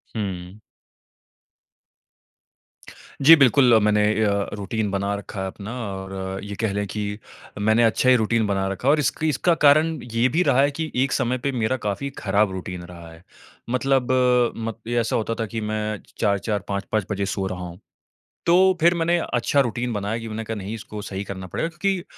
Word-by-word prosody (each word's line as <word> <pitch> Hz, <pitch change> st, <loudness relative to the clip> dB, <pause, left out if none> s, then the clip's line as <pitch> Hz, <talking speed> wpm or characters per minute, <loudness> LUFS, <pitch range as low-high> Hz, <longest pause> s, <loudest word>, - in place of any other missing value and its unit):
हुँ। 95 Hz, -1 st, -5 dB, 2.6 s
जी, 160 Hz, +4 st, +9 dB
बिल्कुल 130 Hz, -3 st, +5 dB
मैंने 105 Hz, 0 st, +3 dB, 0.2 s
अ, 105 Hz, -, +2 dB, 0.2 s
रूटीन 105 Hz, +1 st, -2 dB
बना 100 Hz, +1 st, -1 dB
रखा 100 Hz, -1 st, -6 dB
है 95 Hz, -, -2 dB
अपना 100 Hz, +3 st, -8 dB, 0.2 s
और 95 Hz, 0 st, -5 dB
ये 100 Hz, 0 st, -6 dB
कह 110 Hz, -4 st, 0 dB
लें 100 Hz, 0 st, -1 dB
कि 105 Hz, +1 st, -4 dB, 0.4 s
मैंने 110 Hz, +3 st, +3 dB
अच्छा 115 Hz, +3 st, +3 dB
ही 130 Hz, -, +7 dB
रूटीन 110 Hz, -1 st, +1 dB
बना 95 Hz, -1 st, 0 dB
रखा 95 Hz, +7 st, -4 dB
है -, -, +7 dB
और 155 Hz, -, +3 dB
इसकी 155 Hz, +2 st, 0 dB
इसका 170 Hz, +4 st, +2 dB
कारण 155 Hz, +3 st, +5 dB, 0.2 s
ये 115 Hz, +2 st, +3 dB
भी 170 Hz, +6 st, +2 dB
रहा 135 Hz, -, +3 dB
है 145 Hz, +1 st, +3 dB
कि 160 Hz, -1 st, -2 dB
एक 135 Hz, -, -1 dB
समय 130 Hz, -1 st, 0 dB
पे 140 Hz, +3 st, -2 dB
मेरा 125 Hz, +1 st, 0 dB
काफ़ी 105 Hz, +8 st, -2 dB
ख़राब 100 Hz, 0 st, +1 dB
रूटीन 90 Hz, -1 st, -6 dB
रहा 85 Hz, -1 st, -11 dB
है। 80 Hz, +2 st, -16 dB, 0.5 s
मतलब 130 Hz, 0 st, +1 dB, 0.5 s
म 115 Hz, -1 st, -3 dB
ये 120 Hz, 0 st, +1 dB
ऐसा 115 Hz, -, 0 dB
होता 115 Hz, 0 st, -1 dB
था 115 Hz, -, -2 dB
कि 110 Hz, +2 st, -5 dB
मैं 110 Hz, 0 st, -2 dB
च -, -, -26 dB
4-4 105 Hz, 0 st, 0 dB
5-5 100 Hz, 0 st, -2 dB
बजे 100 Hz, -1 st, -1 dB
सो 95 Hz, -1 st, -2 dB
रहा 95 Hz, -1 st, -5 dB
हूँ, 85 Hz, +2 st, -10 dB, 0.7 s
तो 185 Hz, +1 st, +4 dB
फिर 170 Hz, +1 st, +5 dB
मैंने 170 Hz, +1 st, +2 dB, 0.2 s
अच्छा 125 Hz, +4 st, +2 dB
रूटीन 120 Hz, -1 st, -2 dB
बनाया 105 Hz, +2 st, -2 dB
कि 115 Hz, -, -7 dB
मैंने 110 Hz, +1 st, -4 dB
कहा 110 Hz, 0 st, -5 dB
नहीं 100 Hz, +2 st, -5 dB
इसको 105 Hz, -1 st, -8 dB
सही 100 Hz, 0 st, -5 dB
करना 95 Hz, -2 st, -7 dB
पड़ेगा 165 Hz, -, -2 dB
क्योंकि 180 Hz, +2 st, -1 dB
110 Hz, 190 wpm, -23 LUFS, 100-130 Hz, 2.6 s, जी